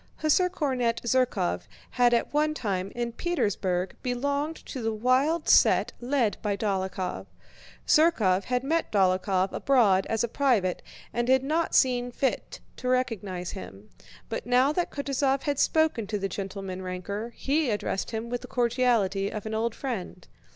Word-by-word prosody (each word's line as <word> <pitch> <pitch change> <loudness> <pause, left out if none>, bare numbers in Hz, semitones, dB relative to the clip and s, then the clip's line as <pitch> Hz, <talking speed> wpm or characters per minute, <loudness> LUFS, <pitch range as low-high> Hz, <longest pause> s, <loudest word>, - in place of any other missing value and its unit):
Hussar 315 +4 +2
cornet 260 -9 -1
Zherkóv 235 - 0 0.2
had 245 -1 +3
at 235 +3 0
one 305 +1 +1
time, 195 -6 -2
in 240 0 -2
Petersburg, 205 - -1
belonged 280 +5 -1
to 260 - -6
the 225 0 0
wild 255 +9 +1
set - - +5
led 245 -4 +1
by 205 -2 -1
Dólokhov. 190 -3 -2 0.6
Zherkóv 225 - +3
had 250 0 -1
met 325 +4 0
Dólokhov 190 -1 +2
abroad 210 -9 +3
as 225 0 0
a - - +1
private 225 -8 +1 0.3
and 240 +1 -1
had 260 0 +4
not 320 +4 0
seen 245 -1 +3
fit 265 +2 -2 0.2
to 255 - -5
recognize 210 -8 -1
him. 105 - -10 0.4
But 225 - -5
now 250 +3 +4
that 350 +3 -1
Kutúzov 275 -1 -1
had 285 -1 -1
spoken 315 -9 +2
to 210 0 -2
the 195 -1 -2
gentleman 195 -1 -5
ranker, 195 +5 -5
he 290 0 0
addressed 205 -2 -2
him 225 0 -4
with 245 - -2
the 250 - -9
cordiality 235 -6 +1
of 210 -1 -6
an 220 - -4
old 225 +1 -1
friend. 195 -9 -5
235 Hz, 155 wpm, -27 LUFS, 195-270 Hz, 0.6 s, set